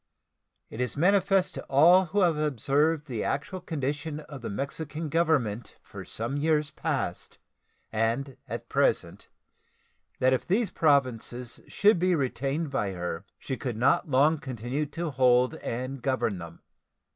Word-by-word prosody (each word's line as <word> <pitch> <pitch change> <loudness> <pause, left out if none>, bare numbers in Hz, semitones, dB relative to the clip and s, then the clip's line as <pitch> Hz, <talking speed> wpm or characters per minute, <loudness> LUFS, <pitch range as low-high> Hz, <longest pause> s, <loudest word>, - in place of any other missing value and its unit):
It 115 - -5
is 125 +2 -2
manifest 195 +2 +3
to - - -7
all 170 +7 +6
who 200 +4 0
have 170 -4 +4
observed 150 +2 +1
the 120 -7 -3
actual 185 +6 -3
condition 150 -1 -3
of 145 -3 -10
the - - -5
Mexican 150 +7 -4
Government 145 -9 0
for - - -10
some 115 +6 -3
years 150 0 +1
past 145 - -3 0.5
and 115 +5 -1
at - - -6
present - - 0 0.9
that 130 0 +3
if 130 - 0
these 205 +4 +1
Provinces 125 -5 0
should 205 -2 +3
be 180 0 +3
retained 140 +2 -1
by 105 -8 -1
her 90 -2 -4
she 130 - -4
could 125 -4 -4
not 130 +5 +2
long 145 +4 +4
continue 130 +1 -3
to 165 +2 -4
hold 125 0 +4
and 130 +1 -4
govern 125 -7 0
them. 85 -1 -10
140 Hz, 145 wpm, -28 LUFS, 125-160 Hz, 0.9 s, all